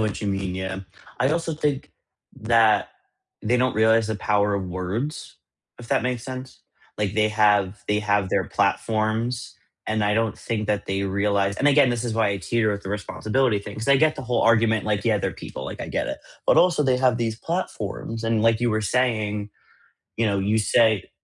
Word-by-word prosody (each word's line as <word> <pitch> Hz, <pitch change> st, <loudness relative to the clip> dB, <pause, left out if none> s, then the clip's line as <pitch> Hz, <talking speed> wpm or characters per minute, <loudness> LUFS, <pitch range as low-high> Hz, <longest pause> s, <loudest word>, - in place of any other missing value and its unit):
what 110 Hz, -2 st, -1 dB
you 105 Hz, -, -3 dB
mean, 95 Hz, -2 st, -2 dB
yeah. 95 Hz, 0 st, -4 dB, 0.4 s
I 130 Hz, -, +3 dB
also 165 Hz, +1 st, -1 dB
think 150 Hz, -3 st, -2 dB, 0.5 s
that 110 Hz, -1 st, +3 dB, 0.5 s
they 120 Hz, +3 st, +2 dB
don't 125 Hz, 0 st, +1 dB
realize 110 Hz, 0 st, +3 dB
the 110 Hz, -, -2 dB
power 105 Hz, 0 st, +1 dB
of 100 Hz, -1 st, -2 dB
words, 95 Hz, -, -4 dB, 0.4 s
if 120 Hz, -1 st, -11 dB
that -, -, +1 dB
makes 125 Hz, -2 st, -2 dB
sense. 130 Hz, 0 st, -8 dB, 0.4 s
Like 105 Hz, -1 st, -2 dB
they 110 Hz, 0 st, +3 dB
have 105 Hz, -2 st, +2 dB
they 105 Hz, -, +1 dB
have 100 Hz, -2 st, +1 dB
their -, -, +1 dB
platforms, 115 Hz, +2 st, -1 dB, 0.3 s
and 110 Hz, -1 st, 0 dB
I 105 Hz, 0 st, +2 dB
don't 115 Hz, -1 st, 0 dB
think 110 Hz, -2 st, -3 dB
that 105 Hz, -1 st, -1 dB
they 95 Hz, 0 st, -1 dB
realize 100 Hz, 0 st, 0 dB
and 140 Hz, -, +3 dB
again, 140 Hz, -2 st, +5 dB
this 120 Hz, 0 st, -2 dB
is 115 Hz, -2 st, -2 dB
why 110 Hz, -2 st, +2 dB
I 100 Hz, -, -2 dB
teeter 110 Hz, +4 st, 0 dB
with 100 Hz, 0 st, -5 dB
the -, -, -7 dB
responsibility 105 Hz, +4 st, 0 dB
thing, 100 Hz, +1 st, -9 dB
'cause 115 Hz, +4 st, -4 dB
I 140 Hz, -, +6 dB
get 155 Hz, +2 st, +2 dB
the 135 Hz, -, -6 dB
whole 125 Hz, -1 st, 0 dB
argument, 110 Hz, -1 st, +3 dB
like, 105 Hz, -1 st, -1 dB
"Yeah, 110 Hz, -3 st, +2 dB
they're -, -, -2 dB
people," 65 Hz, -, -8 dB
like, -, -, -7 dB
I -, -, -5 dB
get -, -, -2 dB
it, -, -, -4 dB, 0.3 s
but -, -, +4 dB
also 175 Hz, -4 st, +4 dB
they 130 Hz, -3 st, +2 dB
have 125 Hz, -2 st, +2 dB
these 115 Hz, -2 st, -2 dB
platforms 115 Hz, -, -4 dB
and 115 Hz, -1 st, +1 dB
like 115 Hz, 0 st, +3 dB
you 120 Hz, -1 st, +1 dB
were 110 Hz, 0 st, 0 dB
saying, 105 Hz, -2 st, -1 dB, 0.7 s
you 115 Hz, -, +1 dB
know, 100 Hz, -2 st, +1 dB
you 105 Hz, +3 st, +1 dB
say 110 Hz, -1 st, +2 dB
110 Hz, 205 wpm, -23 LUFS, 105-120 Hz, 0.7 s, I